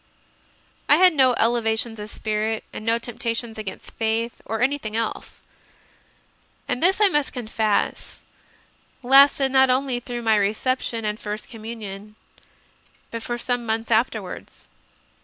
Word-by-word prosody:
I - - +8
had 365 -1 +6
no 260 -4 +4
elevations 225 -1 0
of 210 +1 -7
spirit 215 0 -2
and - - -7
no 230 +1 +2
temptations 235 -1 -4
against 205 -3 -7
faith 225 +1 -2
or 225 - -3
anything 255 -5 -1
else; 230 -1 -4 1.3
and 250 - -2
this, 380 +3 +3
I 420 - +6
must 295 -6 0
con 245 -3 -5
fess, 215 -1 -1 0.9
lasted 270 +1 +6
not 265 0 +5
only 255 -1 +1
through 240 -1 -6
my 220 -1 +3
reception 225 +2 -1
and 210 +1 -2
First 210 0 -6
Communion, 215 -3 -8 1.0
but 230 - -5
for 240 +1 -3
some 245 0 -2
months 225 0 -2
afterwards. 220 -4 -2
230 Hz, 135 wpm, -23 LUFS, 220-255 Hz, 1.3 s, I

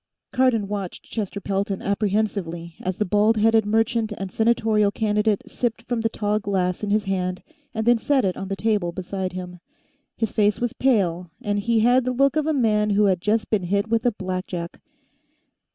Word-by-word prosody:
Cardon 250 -5 +2
watched 200 -3 -5
Chester 205 -3 -4
Pelton 195 0 -2
apprehensively 200 -5 -1
as 185 -1 -3
the 210 - 0
bald 210 +3 +3
headed 220 0 +3
merchant 225 +1 +1
and 195 -1 -5
senatorial 220 -2 +2
candidate 210 0 0
sipped 230 -2 -3
from 235 -1 -2
the 225 - +1
tall 210 -1 -1
glass 190 -2 -1
in 210 - -1
his 210 +1 +2
hand 185 -2 -2 0.3
and 220 -1 -3
then 240 -1 +4
set 270 -1 +2
it 185 - 0
on 195 - -5
the 195 - -2
table 205 -4 0
beside 185 0 -4
him. 180 -1 -7 0.6
His 225 -2 -1
face 210 -1 +2
was 240 0 -1
pale, 185 -10 +1
and 205 -4 -1
he 225 +2 +1
had 245 +3 +4
the 255 +1 -1
look 275 +2 +3
of 310 -1 +1
a - - +2
man 215 -6 +2
who 205 +1 +3
has 190 -3 +2
just 210 +4 0
been 215 -3 +2
hit 200 +4 0
with 225 0 +1
a 245 - +3
blackjack. 185 -3 -5
210 Hz, 190 wpm, -23 LUFS, 195-225 Hz, 0.6 s, then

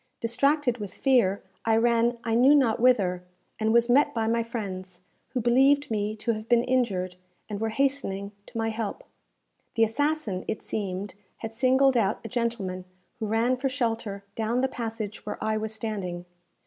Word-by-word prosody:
Distracted 250 +2 +1
with 205 -3 -6
fear, 240 -8 +2 0.2
I 225 0 +3
ran 235 +1 +3
I 230 - -1
knew 260 +5 +6
not 255 -6 +3
whither, 195 -8 +3 0.4
and 220 0 +1
was 235 +1 +4
met 255 +3 +4
by 225 -1 0
my 230 +1 +1
friends, 190 -6 -6 0.3
who 255 +1 -2
believed 270 +4 +3
me 210 0 -1
to 220 +2 -1
have 215 0 -5
been 240 -1 +4
injured, 200 -8 0 0.3
and 210 -1 -5
were 225 - 0
hastening 220 -6 -1 0.2
to - - -8
my 225 0 0
help. 225 - -4 0.7
The 225 - +4
assassin, 225 -4 0
it 220 - -3
seemed, 195 -1 -3 0.3
had 225 - -6
singled 260 +3 +4
out 210 -3 +1
a - - -5
gentleman 230 -7 -2 0.3
who 220 - -2
ran 230 +4 +2
for 270 +2 -1
shelter 225 -6 -2
down 225 +3 0
the 265 - +2
passage 225 -4 -5
where - - -5
I 220 0 0
was 215 0 -3
standing. 195 -6 -4
225 Hz, 175 wpm, -27 LUFS, 210-250 Hz, 0.7 s, knew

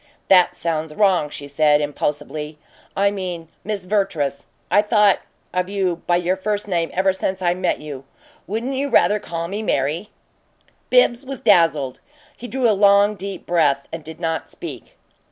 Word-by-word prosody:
"That 180 -1 +5
sounds 160 -3 -3
wrong," 190 -7 +3
she 145 -1 -8
said, 150 +1 +3
impulsively. 150 +1 -3 0.4
"I 200 +1 +3
mean 180 -5 -5
'Miss 205 -3 -4
Vertrees.' 165 -9 -1 0.2
I've 205 +1 +4
thought 210 -3 +4 0.3
of 180 +1 -1
you 190 -4 0
by 175 - +3
your 175 +1 +1
first 205 +2 -2
name 170 -4 0
ever 190 +1 +2
since 190 0 -2
I 175 -2 +1
met 185 0 -1
you. 145 -3 -7 0.4
Wouldn't 230 +7 -2
you 275 +2 -1
rather 210 -4 +4
call 170 -4 -4
me 200 +4 -4
'Mary'?" 160 +1 -1 0.8
Bibbs 280 - +4
was 270 -1 -6
dazzled; 165 - +3 0.4
he 245 - -8
drew 255 -1 +1
a 220 - +4
long, 200 +1 +5
deep 200 -1 -7
breath 145 -5 +2
and 165 -1 -6
did 160 +1 -10
not 165 -2 -2
speak. 140 -9 -9
180 Hz, 165 wpm, -21 LUFS, 155-205 Hz, 0.8 s, That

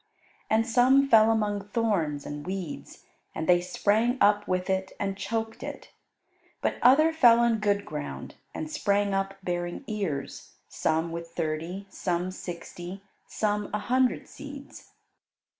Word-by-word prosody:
And 220 +1 +3
some 260 +4 +5
fell 225 -3 +6
among 205 -2 0
thorns 195 -10 0
and 145 0 -6
weeds, 185 -3 -6 0.3
and 160 - -3
they 175 -1 +5
sprang 215 +7 +1
up 205 0 +4
with 185 0 -1
it 190 0 -1
and 195 -1 -1
choked 225 +2 -3
it. - - -8 0.7
But - - -1
other 310 +6 +6
fell 240 -7 +6
on 235 -2 +3
good 205 -1 +1
ground, 150 -1 -6 0.2
and 315 - -5
sprang 205 -9 0
up 195 0 -1
bearing 175 +4 -3
ears, 195 - -4
some 160 +1 -1
with 170 0 -5
thirty, 165 +4 -3
some 180 -1 -2
sixty, 175 +1 -8 0.2
some 210 -1 -1
a - - -1
hundred 255 -1 +2
seeds. 285 -1 -11
200 Hz, 140 wpm, -27 LUFS, 175-225 Hz, 0.7 s, fell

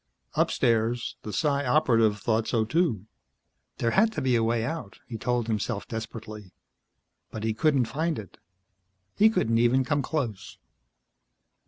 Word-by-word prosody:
Upstairs, 115 +1 +1
the 105 - -6
Psi 140 +2 +1
Operative 115 -6 +3
thought 110 0 0
so, 115 -3 +1
too. 120 - 0 0.7
There 115 - 0
had 220 - +4
to - - -3
be 130 -2 +2
a 115 - +3
way 115 0 +1
out, 130 -8 -5
he 115 - -7
told 120 +1 -1
himself 110 -1 -2
desperately. 110 -3 -7 0.8
But 110 - -7
he 110 0 0
couldn't 135 +2 +2
find 160 +6 -2
it. 105 -3 -10 0.8
He 215 +2 +6
couldn't 115 - +1
even 125 +2 +3
come 145 +1 +1
close. 130 -9 -4
115 Hz, 145 wpm, -27 LUFS, 110-140 Hz, 0.8 s, He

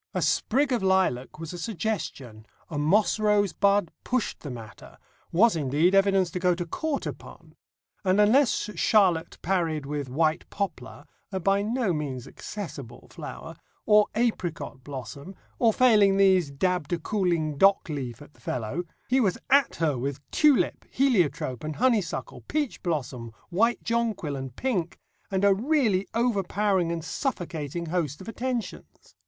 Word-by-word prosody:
A - - 0
sprig 275 +4 +1
of 240 - 0
lilac 190 -11 +1
was 165 +1 -7
a 175 - -6
suggestion, 170 - -4 0.2
a 150 - -2
moss 200 +9 +3
rosebud 205 -3 +2
pushed 250 -2 -1
the 145 - -7
matter, 115 -4 -10 0.3
was 210 +4 +4
indeed 155 +4 +2
evidence 195 -2 +3
to 180 - -3
go 180 -1 +2
to 175 0 -4
court 295 - -3
upon; - - -9 0.5
and 190 +1 +2
unless 220 0 +3
Charlotte 185 -8 +2
parried 165 -5 0
with 145 -2 -4
white 155 +4 0
poplar 145 -8 -5 0.3
a 190 - -2
by 195 +2 +2
no 220 -2 0
means 140 -5 -4
accessible 140 - -8
flower - - -8 0.3
or 210 0 +5
apricot 175 - -2
blossom, 140 - -8 0.2
or 230 -2 +5
failing 210 -5 +4
these 190 -5 +4
dabbed 175 +2 -1
a - - +2
cooling 170 -4 0
dock 195 0 +5
leaf 135 -5 -5
at 145 - -18
the 120 - -24
fellow, 125 +9 -3 0.2
he 260 +2 +3
was 200 -7 +1
at 280 -1 +4
her 150 -6 0
with 135 +2 -3
tulip, 300 -4 +3
heliotrope, 175 - +1
and 155 0 -4
honeysuckle, 225 -9 0
peach 295 -4 -2
blossom, 130 - -3 0.2
white 230 +7 +2
jonquil, 230 -10 -1
and 135 -2 -6
pink, 195 -11 -2 0.3
and 195 0 +1
a 200 - +6
really 220 -4 +1
overpowering 200 -5 +1
and 165 -1 -4
suffocating 170 - -3
host 160 -4 -2
of 190 - -11
attentions. 240 0 -5
185 Hz, 150 wpm, -26 LUFS, 150-215 Hz, 0.5 s, a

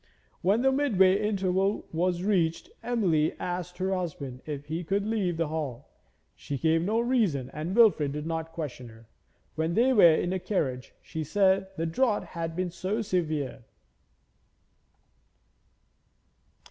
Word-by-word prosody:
When 200 +7 +2
the 265 - +4
mid 270 -6 0
way 190 +2 +5
interval 195 -1 0
was 175 +2 0
reached 175 -5 0
Emily 180 -11 +1
asked 180 0 -4
her 190 +1 -1
husband 145 -8 -4
if 145 -2 -5
he 160 +4 -4
would 200 +1 +1
leave 200 -6 -1
the 165 -2 -1
hall. 145 -5 -4 0.5
She 140 - -5
gave 160 +3 +2
no 210 +6 +1
reason 215 - +1
and 160 +5 -4
Wilfrid 205 -12 +5
did 150 +1 -4
not 165 0 -3
question 145 -7 -6
her. 115 0 -16 0.5
When 160 +2 -1
they 255 +3 +4
were 170 -8 +7
in 175 - -1
the 190 - -1
carriage 135 -11 -2
she 160 - -5
said 190 +3 +2
the 165 - -1
draught 215 +6 0
had 165 -1 -4
been 180 0 -2
too 195 +6 -2
severe. 155 - -2
175 Hz, 145 wpm, -28 LUFS, 155-200 Hz, 0.5 s, were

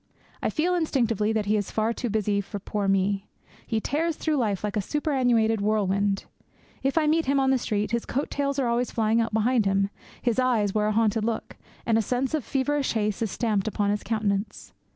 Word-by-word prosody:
I - - 0
feel 345 +3 0
instinctively 235 - +1
that 220 -2 0
he 210 +1 +2
is 205 -2 -1
far 220 +1 0
too 240 +1 -3
busy 205 -1 +1
for 205 +1 -6
poor 205 +1 -3
me. 195 +1 +1 0.4
He 225 - 0
tears 315 +8 -1
through 310 -1 0
life 210 -7 0
like 210 -1 -2
a 210 - +1
superannuated 245 - +1
whirlwind. 200 -1 +1 0.6
If 270 +3 0
I 320 - +4
meet 320 0 +2
him 275 0 +3
on 265 0 +3
the 265 - +3
street, 210 -3 -1
his 235 -1 -1
coat 275 +4 -2
tails 280 -1 -1
are 270 - +1
always 235 +1 +1
flying 225 0 +2
out 230 - -1
behind 220 0 +2
him; 195 +1 +1 0.3
his 240 0 0
eyes 230 -6 +2
wear 210 -1 +1
a - - +1
hunted 220 0 +2
look; 225 0 -3 0.3
and 225 -1 +3
a - - +3
sense 250 +6 -1
of 310 -4 0
feverish 280 +2 0
haste 210 -2 -1
is 225 - 0
stamped 215 -2 0
upon 205 -1 0
his 210 - -1
countenance. 210 -2 -2
225 Hz, 215 wpm, -26 LUFS, 210-260 Hz, 0.6 s, I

